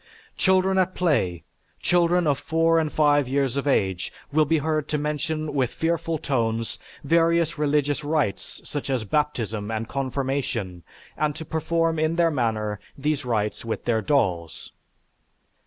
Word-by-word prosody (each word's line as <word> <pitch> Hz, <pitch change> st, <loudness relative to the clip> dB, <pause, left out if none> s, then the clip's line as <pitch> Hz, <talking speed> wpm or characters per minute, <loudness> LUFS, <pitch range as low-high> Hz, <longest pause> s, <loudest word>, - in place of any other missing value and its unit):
Children 190 Hz, 0 st, +3 dB
at 185 Hz, 0 st, +1 dB
play, 115 Hz, -, +1 dB, 0.4 s
children 175 Hz, 0 st, +3 dB
of 145 Hz, -2 st, +2 dB
four 165 Hz, 0 st, +2 dB
and 155 Hz, -2 st, -1 dB
five 145 Hz, -3 st, +3 dB
years 135 Hz, -1 st, 0 dB
of 140 Hz, +1 st, -2 dB
age, 95 Hz, -9 st, +1 dB, 0.2 s
will 155 Hz, 0 st, +4 dB
be 160 Hz, +2 st, +2 dB
heard 155 Hz, 0 st, -1 dB
to 150 Hz, -, -1 dB
mention 150 Hz, +1 st, -2 dB
with 130 Hz, -4 st, +1 dB
fearful 165 Hz, +1 st, -1 dB
tones 115 Hz, -5 st, -1 dB, 0.2 s
various 165 Hz, +1 st, +2 dB
religious 145 Hz, 0 st, +1 dB
rites, 145 Hz, -8 st, -2 dB
such 145 Hz, -1 st, -4 dB
as 130 Hz, -4 st, 0 dB
baptism 110 Hz, -5 st, -1 dB
and 110 Hz, 0 st, -3 dB
confirmation, 130 Hz, -8 st, -2 dB, 0.3 s
and 150 Hz, -1 st, 0 dB
to 160 Hz, -, -7 dB
perform 165 Hz, +1 st, 0 dB
in 155 Hz, +1 st, +1 dB
their 170 Hz, -1 st, +3 dB
manner 110 Hz, -6 st, -1 dB, 0.2 s
these 145 Hz, -1 st, -1 dB
rites 105 Hz, -3 st, -1 dB
with 115 Hz, -1 st, -4 dB
their 115 Hz, -2 st, +1 dB
dolls. 95 Hz, -, -1 dB
145 Hz, 145 wpm, -24 LUFS, 115-160 Hz, 0.4 s, will